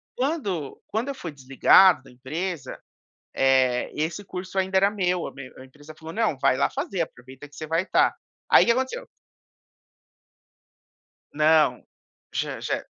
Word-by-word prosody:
Quando 230 Hz, -, -3 dB
quando 225 Hz, +5 st, -2 dB
eu 275 Hz, -, -4 dB
fui 175 Hz, -11 st, -7 dB
desligado 135 Hz, +4 st, +5 dB
da -, -, -16 dB
empresa, 140 Hz, +3 st, -5 dB, 0.6 s
eh, 130 Hz, -2 st, +2 dB
esse 160 Hz, +6 st, -3 dB
curso 185 Hz, +1 st, -8 dB
ainda 190 Hz, 0 st, 0 dB
era 195 Hz, +1 st, +4 dB
meu, 180 Hz, -4 st, -1 dB
a -, -, -8 dB
me 140 Hz, -2 st, -10 dB
a 130 Hz, -, -11 dB
empresa 145 Hz, +3 st, -14 dB
falou: 160 Hz, +1 st, -9 dB
"Não, 215 Hz, -9 st, 0 dB
vai 130 Hz, -, +2 dB
lá 140 Hz, -, +2 dB
fazer, 275 Hz, -, -4 dB
aproveita 130 Hz, -1 st, -10 dB
que 145 Hz, -, -20 dB
você 155 Hz, -, -6 dB
vai 165 Hz, +2 st, 0 dB
estar". 190 Hz, -, +2 dB, 0.3 s
Aí -, -, +7 dB
o -, -, -6 dB
que 235 Hz, -, +5 dB
aconteceu... 260 Hz, -, -3 dB, 2.3 s
Não, 155 Hz, +1 st, +3 dB, 0.5 s
já -, -, -3 dB
já -, -, -3 dB
160 Hz, 155 wpm, -24 LUFS, 135-195 Hz, 2.3 s, Aí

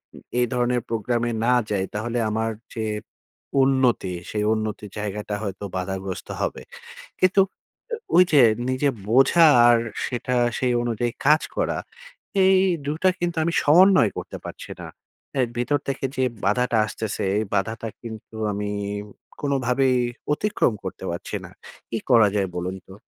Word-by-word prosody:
উ -, -, -12 dB, 0.2 s
এই 125 Hz, -, +4 dB
ধরনের 125 Hz, 0 st, +1 dB
প্রোগ্রামে 120 Hz, +1 st, -1 dB
না 125 Hz, -, +4 dB, 0.2 s
যাই, 95 Hz, -2 st, +1 dB
তাহলে 115 Hz, +3 st, -2 dB
আমার 110 Hz, +1 st, -1 dB, 0.2 s
যে 110 Hz, -1 st, -2 dB, 0.8 s
উন্নতি, 130 Hz, -8 st, +2 dB, 0.2 s
সেই 105 Hz, -1 st, -1 dB
উন্নতির 105 Hz, -2 st, -4 dB
জায়গাটা 105 Hz, 0 st, -3 dB
হয়তো 100 Hz, 0 st, -5 dB
বাধাগ্রস্ত 95 Hz, 0 st, -4 dB
হবে। -, -, -2 dB, 0.6 s
কিন্তু 185 Hz, +1 st, +5 dB, 0.5 s
ও -, -, 0 dB, 0.2 s
ওইযে 165 Hz, -7 st, +6 dB, 0.3 s
নিজে 130 Hz, +3 st, +1 dB, 0.2 s
বোঝা 135 Hz, +7 st, +6 dB, 0.2 s
আর 120 Hz, -1 st, +6 dB, 0.3 s
সেটা 125 Hz, 0 st, -2 dB, 0.2 s
সেই 125 Hz, -1 st, +1 dB
অনুযায়ী 120 Hz, 0 st, -1 dB
কাজ 150 Hz, +2 st, +5 dB
করা, -, -, 0 dB, 0.7 s
এই 190 Hz, 0 st, +6 dB, 0.3 s
২ 150 Hz, +2 st, -1 dB
টা 185 Hz, -, +7 dB
কিন্তু 175 Hz, -1 st, -1 dB
আমি 170 Hz, -, 0 dB
সমন্বয় 175 Hz, -, +6 dB
করতে -, -, -6 dB
পারছি -, -, -9 dB
না। -, -, -7 dB, 0.5 s
এই 125 Hz, -, +3 dB
ভিতর 145 Hz, +4 st, +1 dB
থেকে 135 Hz, 0 st, -3 dB
যে 130 Hz, -, +2 dB, 0.2 s
বাধাটা 115 Hz, +3 st, +2 dB
আসতেছে, 110 Hz, 0 st, -4 dB, 0.2 s
এই 110 Hz, -, 0 dB
বাধাটা 110 Hz, +3 st, -1 dB
কিন্তু 110 Hz, -1 st, -9 dB, 0.2 s
আমি 105 Hz, 0 st, -3 dB, 0.7 s
কোনভাবেই 130 Hz, -2 st, +1 dB, 0.4 s
অতিক্রম 175 Hz, -, +1 dB
করতে 95 Hz, -, -6 dB
পারছি 85 Hz, -, -4 dB
না। -, -, -10 dB, 0.4 s
কি 115 Hz, -, -1 dB
করা 115 Hz, -4 st, +7 dB
যায় 95 Hz, -1 st, +1 dB
বলুন 90 Hz, +2 st, -3 dB
তো? 95 Hz, -, -12 dB
120 Hz, 145 wpm, -23 LUFS, 105-135 Hz, 0.8 s, টা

